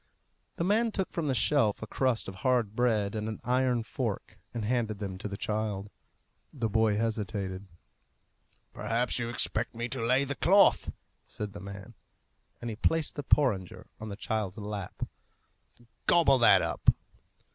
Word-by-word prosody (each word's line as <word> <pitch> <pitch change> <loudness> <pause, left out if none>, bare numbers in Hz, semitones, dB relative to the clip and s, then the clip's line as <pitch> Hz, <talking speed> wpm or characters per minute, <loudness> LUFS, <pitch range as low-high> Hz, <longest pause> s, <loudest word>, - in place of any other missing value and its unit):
The - - -2
man 220 +5 +2
took 190 -3 -2
from 165 -3 -2
the 135 - +1
shelf 115 -6 +2
a - - -2
crust 125 0 0
of 95 -1 -7
hard 120 -4 +1
bread 110 -5 +1
and 110 0 -3
an 110 - -5
iron 125 -1 +1
fork, - - -4
and 115 -3 -4
handed 115 -2 0
them 100 -2 -5
to 105 - -4
the 100 -1 -5
child. 105 -2 -2 0.6
The 120 -5 -2
boy 110 -1 +2
hesitated. 100 -4 -2 1.1
"Perhaps 115 +4 0
you 115 -1 -2
expect 120 -1 0
me 120 +1 -2
to 115 - -2
lay 130 +4 +3
the 140 0 -2
cloth," 195 +7 +4 0.4
said 105 -1 -5
the 100 - -8
man, 100 +3 -9 0.7
and 120 - -3
he - - -5
placed 160 +6 +1
the 145 - -4
porringer 125 -10 +1
on 110 - -6
the 100 - -5
child's 105 -1 -3
lap. 105 -3 -5 1.0
"Gobble 160 -6 +5
that 120 - +6
up." - - +2
115 Hz, 160 wpm, -29 LUFS, 105-125 Hz, 1.1 s, that